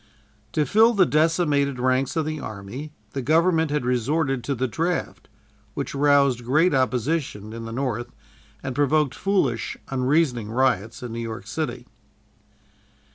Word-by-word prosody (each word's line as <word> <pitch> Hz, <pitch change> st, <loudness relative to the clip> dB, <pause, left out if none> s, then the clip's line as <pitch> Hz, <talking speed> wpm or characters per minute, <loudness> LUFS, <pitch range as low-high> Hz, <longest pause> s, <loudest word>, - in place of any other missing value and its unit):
To 150 Hz, -, +2 dB
fill 225 Hz, +5 st, +4 dB
the 190 Hz, -2 st, +5 dB
decimated 150 Hz, -4 st, +2 dB
ranks 130 Hz, +1 st, +1 dB
of 160 Hz, -2 st, 0 dB
the 155 Hz, 0 st, -3 dB
army, 110 Hz, +7 st, -7 dB, 0.2 s
the 135 Hz, -, -3 dB
Government 160 Hz, +3 st, +3 dB
had 145 Hz, -3 st, -1 dB
resorted 135 Hz, +2 st, 0 dB
to 140 Hz, -, -1 dB
the 130 Hz, +2 st, -1 dB
draft, 165 Hz, +8 st, -3 dB, 0.5 s
which 140 Hz, -, -4 dB
roused 140 Hz, -3 st, +3 dB
great 155 Hz, +9 st, +3 dB
opposition 130 Hz, -4 st, -1 dB
in 115 Hz, 0 st, -6 dB
the 115 Hz, -, -6 dB
North 120 Hz, -1 st, -2 dB, 0.5 s
and 130 Hz, -1 st, -3 dB
provoked 145 Hz, 0 st, +2 dB
foolish, 180 Hz, -, 0 dB
unreasoning 130 Hz, -3 st, +1 dB
riots 115 Hz, -2 st, 0 dB
in 120 Hz, -2 st, -5 dB
New 115 Hz, -, -4 dB
York 115 Hz, -1 st, -5 dB
City. -, -, -4 dB
135 Hz, 140 wpm, -24 LUFS, 120-155 Hz, 0.5 s, the